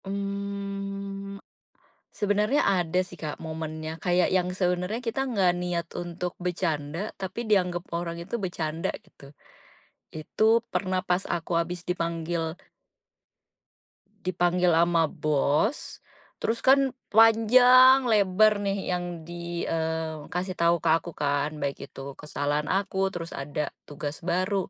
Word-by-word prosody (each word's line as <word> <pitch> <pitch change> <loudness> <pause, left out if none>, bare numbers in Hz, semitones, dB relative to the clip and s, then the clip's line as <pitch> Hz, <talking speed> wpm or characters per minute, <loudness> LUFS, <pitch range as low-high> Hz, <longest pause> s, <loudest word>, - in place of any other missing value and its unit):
Mmm, 200 0 -4 0.7
sebenarnya 210 +6 +1
ada 180 -2 +2
sih, 180 - -13
Kak, 155 -2 -4
momennya 160 0 -6
kayak 180 0 +2
yang 180 -1 +2
sebenarnya 180 +2 -1
kita 230 +4 -1
nggak 195 -7 +3
niat 175 -1 -2
untuk 175 0 -4
bercanda 170 +1 -2
tapi 190 +5 -4
dianggap 180 -5 +1
orang 170 0 -3
itu 195 +7 -5
bercanda 165 -3 -2 0.2
gitu, 140 - -16 0.9
itu 155 +7 -2 0.3
pernah 185 -1 0
pas 180 +1 +1
aku 170 +1 -6
habis 175 +1 -4
dipanggil 170 -1 -2 1.7
Dipanggil 180 0 +2
ama 165 -1 +3
bos, 155 - 0 0.4
terus 230 +1 -1
kan 270 0 +4 0.2
panjang, 250 +4 +7
lebar 210 -1 +4
nih 195 -2 -1
yang 175 -2 -4
di, 170 0 -5
eee, 160 -1 -2
kasih 185 +2 -2
tahu 170 0 +3
ke 165 0 -1
aku 165 +1 0
kan, 145 0 0
baik 140 -1 -4
itu 135 +1 -8
kesalahan 150 +1 -2
aku 195 0 0
terus 170 -1 -6
ada 145 +1 -4 0.2
tugas 145 0 -6
baru. 185 +2 0
180 Hz, 120 wpm, -27 LUFS, 165-200 Hz, 1.7 s, panjang